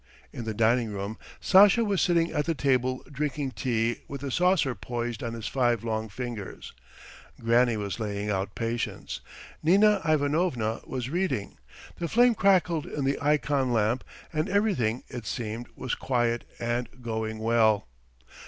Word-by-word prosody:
In 120 - -6
the 110 - -2
dining 115 +1 +2
room 100 +2 -5 0.2
Sasha 205 +4 +6
was 200 -3 +1
sitting 170 -1 +2
at 150 - 0
the 165 - 0
table 130 -2 +1
drinking 145 -1 -2
tea 120 -3 -1
with 140 -1 -6
the 140 -1 -4
saucer 180 -3 +3
poised 120 +3 -4
on 115 -1 -4
his 115 -1 -7
five 120 -4 +1
long 110 -1 -2
fingers; 115 -1 -6 0.7
Granny 115 0 +3
was 100 +1 -4
laying 105 -1 -3
out 100 -1 -2
patience; 115 +1 -3 0.4
Nina 200 +5 +5
Ivanovna 145 -7 +1
was 130 0 -4
reading. 160 - -2 0.4
The 170 - -1
flame 240 +5 +5
crackled 185 -6 +2
in 145 -2 -3
the 135 +1 0
ikon 145 -3 +1
lamp 115 +3 +1 0.3
and 155 0 0
everything, 145 - +1
it 120 -3 -7
seemed, 115 +1 -4
was 130 - -3
quiet 120 -2 0
and 120 +1 -1
going 110 -1 -3
well. 110 - +2
125 Hz, 150 wpm, -27 LUFS, 115-150 Hz, 0.7 s, Sasha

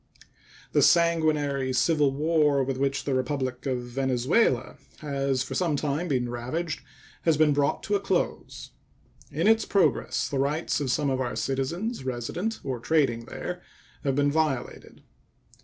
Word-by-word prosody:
The - - +3
sanguinary 155 -5 +3
civil 150 +2 +3
war 150 -1 +2
with 130 0 -2
which 135 0 0
the 140 - -1
Republic 130 0 -2
of 125 -2 -1
Venezuela 130 - +1 0.2
has 140 -3 -1
for - - -7
some 170 -5 +1
time 150 +4 -1
past - - -7
been 125 -3 0
ravaged 145 +7 -3 0.4
has 160 -3 +2
been 155 -1 +4
brought 140 0 0
to 210 - -2
a 200 - +3
close. 195 -2 -2 0.6
In 160 +5 -2
its 225 0 +5
progress 200 -2 +1
the 140 - -2
rights 150 +5 0
of 140 -3 -2
some 140 +2 +1
of 130 0 0
our 125 - -2
citizens 150 - -2
resident 130 - -3
or 130 -3 -3
trading 120 -4 +1
there 180 +7 -6 0.4
have 135 -3 0
been 145 0 +2
violated. 150 -5 -2
140 Hz, 155 wpm, -26 LUFS, 130-160 Hz, 0.6 s, its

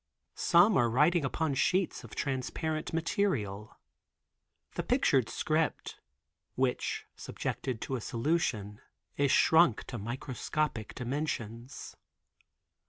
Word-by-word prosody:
Some 180 +5 +5
are 120 -3 +3
writing 150 +7 +3
upon 150 +2 -1
sheets 185 +7 +1
of - - -11
transparent 150 +4 -2
material. 140 - -1 1.0
The - - -2
pictured - - +2
script, - - -1 0.6
which 130 -1 -1
subjected 125 -5 -4
to 135 - -3
a 125 - -4
solution, 115 -6 -1 0.3
is 140 -1 +2
shrunk 160 -8 +5
to 120 - -6
microscopic 125 +2 -3
dimensions. 125 -2 -4
135 Hz, 100 wpm, -31 LUFS, 115-160 Hz, 1.0 s, Some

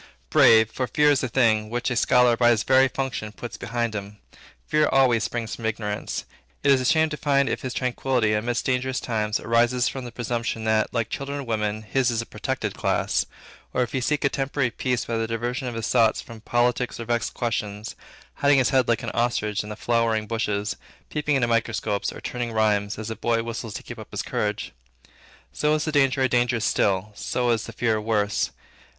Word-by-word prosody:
Brave; 110 0 +6
for 130 - -2
fear 150 +1 +4
is 140 - +2
a 130 - -1
thing, 110 -4 +2
which 120 +2 -2
a - - 0
scholar 125 0 +4
by 120 0 +4
his 110 -3 +3
very 130 0 +5
function 130 -5 -4
puts 120 +2 -8
behind 115 0 -2
him. 100 0 -6 0.5
Fear 150 0 +2
always 125 -4 +3
springs 115 -2 -3
from 115 - -4
ignorance. 105 -2 -3 0.4
It 140 - +5
is 135 -2 +4
a - - -2
shame 160 +4 +3
to 150 -1 -5
him 140 0 +4
if - - -2
his 130 -1 -4
tranquility, 125 -3 0
amid 115 +3 -1
dangerous 130 0 0
times, 110 -2 -1
arise 120 +2 +2
from 135 - -4
the 120 - -7
presumption, 115 -1 -3
that, 110 -1 +1
like 115 -2 -2
children 140 +1 -4
and 140 -3 -6
women, 110 -1 -1
his 125 +3 +1
is 115 -2 -1
a 115 - -2
protected - - -3
class; - - 0 0.5
or 125 - +3
if 120 - -5
he 130 - -1
seek 150 +3 0
a - - +4
temporary 135 -2 -1
peace 125 0 -1
by 115 - -2
the 115 0 -1
diversion 120 +3 -3
of 120 - -4
his 115 -2 -2
thoughts 115 -3 +3
from 115 -2 -10
politics 120 +2 0
or 115 - -5
vexed 120 0 -1
questions, 105 -3 -3 0.4
hiding 145 0 +4
his 130 -2 +3
head 130 -3 +3
like 115 -1 +1
an - - -3
ostrich 110 -3 0
in 105 - -8
the 105 - -5
flowering 115 -1 +1
bushes, 105 -2 -2 0.3
peeping 150 -1 0
into 130 -3 +2
microscopes, 115 -3 0
and - - -11
turning 120 -1 -3
rhymes, 105 -2 +1
as 110 0 -5
a - - -3
boy 115 0 0
whistles 115 -2 -5
to - - -6
keep - - -9
his - - -4
courage - - -2 0.3
up. - - -28 0.4
So 150 - +2
is 155 - -1
the 155 - -1
danger 135 -2 +3
a - - +4
danger 120 -1 +1
still; 100 -1 +1
so 120 +4 -1
is 115 -2 0
the - - -7
fear 110 -1 0
worse. 105 -9 0
120 Hz, 210 wpm, -24 LUFS, 110-130 Hz, 0.5 s, Brave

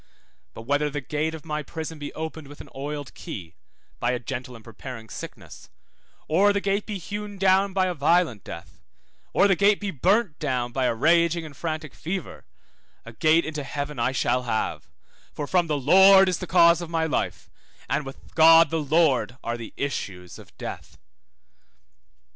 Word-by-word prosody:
But 115 - -8
whether 145 +4 +1
the 145 0 -4
gate 155 +3 -2
of 160 - -11
my 150 -1 -3
prison 160 +1 -7
be 145 - -6
opened 160 -1 -6
with 145 +1 -13
an - - -11
oiled 145 0 -6
key 90 -4 -8 0.5
(by 120 +1 0
a - - 0
gentle 125 +1 -6
and 115 - -13
preparing 115 0 -9
sickness), - - -10 0.6
or 195 +6 +4
the 200 - 0
gate 200 +1 -1
be 210 -2 -3
hewn 205 +2 -6
down 195 +1 +3
by 190 0 +1
a 180 - -1
violent 155 - +1
death, 85 +1 -10 0.5
or 200 - +4
the 195 - +3
gate 200 +3 +3
be 205 -2 -3
burnt 190 - +1
down 125 -5 -1
by 130 +1 -1
a 120 - +1
raging 170 +5 +3
and 150 -3 -11
frantic 155 -1 -4
fever, 180 0 -6 0.6
a 115 - -10
gate 155 +8 +3
into 155 -2 -4
heaven 140 0 -5
I 120 +2 +1
shall 125 -1 +1
have, 115 -3 -3 0.5
for 145 - -3
from 175 +2 +1
the 150 -2 0
Lord 190 +7 +7
is 180 -2 0
the 185 - -6
cause 170 -1 +5
of 170 - -6
my 165 -1 0
life, 160 - -2 0.4
and 150 - 0
with 135 0 -12
God 165 -1 +7
the 165 -1 0
Lord 145 -4 +2
are 115 - -2
the 115 -2 -8
issues 90 -10 -5
of - - -17
death. - - -8
155 Hz, 185 wpm, -25 LUFS, 130-175 Hz, 0.6 s, Lord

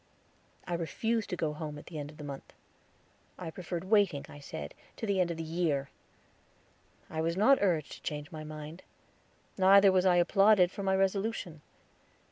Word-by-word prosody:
I 175 - -4
refused 220 +7 -1
to - - -2
go 160 -3 -2
home 150 -1 -6
at 150 - -11
the 160 -3 -7
end 145 0 -5
of 150 - -14
the 150 - -9
month. 140 -2 -8 0.8
I 170 -3 -6
preferred 175 0 -5
waiting, 190 -7 +2
I 145 - -11
said, 75 - -7 0.2
to - - -4
the 200 -3 0
end 175 - +1
of 170 - -4
the 165 - -4
year. 160 -4 -1 1.2
I 160 0 -3
was 165 +2 -1
not 265 +7 +5
urged 170 -7 +1
to - - -10
change 150 0 -5
my 155 -1 -7
mind; 155 +2 -8 0.8
neither 195 +1 +7
was 185 0 +3
I 180 - +5
applauded 190 +1 +5
for 200 - -6
my 190 -1 +1
resolution. 195 -4 -1
175 Hz, 180 wpm, -31 LUFS, 155-195 Hz, 1.2 s, neither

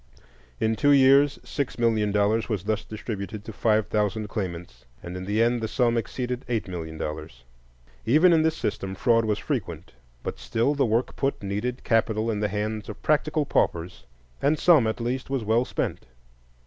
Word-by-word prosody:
In 110 0 +1
two 145 +5 +2
years 140 +1 +5
six 140 -3 -3
million 110 -3 +2
dollars 105 +3 +1
was 105 -5 -2
thus 110 0 -1
distributed 105 -1 -6
to 110 - -7
five 110 0 +2
thousand 105 0 -1
claimants, 85 - -5 0.2
and 85 +1 -7
in 90 0 -5
the 105 +3 +2
end 120 0 +1
the 110 - -1
sum 120 +1 +1
exceeded 125 +2 -3
eight 115 -4 -1
million 80 -3 -6
dollars. 75 -6 -6 0.6
Even 155 +8 +5
in 160 - +4
this 160 0 +1
system 95 -2 -3
fraud 115 +2 +3
was 105 -1 0
frequent; - - -4 0.3
but - - -5
still 115 - 0
the 140 -3 +1
work 115 +3 0
put 135 -6 -2
needed 105 +6 -3
capital 115 -1 +1
in 105 - -2
the 105 - +1
hands 105 +1 -3
of - - -9
practical 155 0 +1
paupers, 85 - -1 0.3
and 150 +2 +2
some, 150 -8 +5
at 110 - -2
least, 125 +3 -3
was 135 -4 -1
well 115 +3 +2
spent. - - -3
110 Hz, 180 wpm, -25 LUFS, 100-125 Hz, 0.6 s, years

